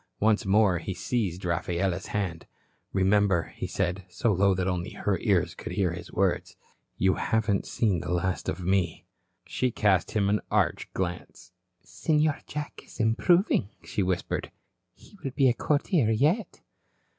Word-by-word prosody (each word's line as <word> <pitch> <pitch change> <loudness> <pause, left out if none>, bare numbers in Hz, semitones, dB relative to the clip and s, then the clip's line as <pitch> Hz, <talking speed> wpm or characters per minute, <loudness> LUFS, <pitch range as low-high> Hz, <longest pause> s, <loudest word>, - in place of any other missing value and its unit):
Once 105 -1 +2
more 100 -3 +4
he 95 - -5
seized 95 -3 -2
Rafaela's 85 +1 -1
hand. 95 -5 -3 0.4
"Remember," 95 -3 +2
he - - -4
said, 95 0 -2
so 115 +4 +1
low 100 +1 +3
that 90 0 -1
only 90 -1 -2
her - - -1
ears - - +1
could - - -7
hear 95 -4 +1
his 90 +1 -8
words, 95 -1 0 0.4
"you 95 0 +3
haven't 110 -3 0
seen 100 -7 +1
the 80 - -6
last 90 +1 -1
of 90 - -4
me." 95 -3 0 0.4
She 130 - 0
cast 100 -6 +2
him 100 -2 +1
an 105 +1 +2
arch - - 0
glance. 90 -2 -5 0.3
"Senor 155 -1 +1
Jack 150 -1 -6
is - - -15
improving," 115 - +3
she - - -2
whispered. 90 -1 -1 0.5
"He 205 - -19
will 135 - -3
be 135 - +4
a 125 - +4
courtier 145 - +1
yet." 150 - +1
100 Hz, 155 wpm, -27 LUFS, 90-110 Hz, 0.5 s, more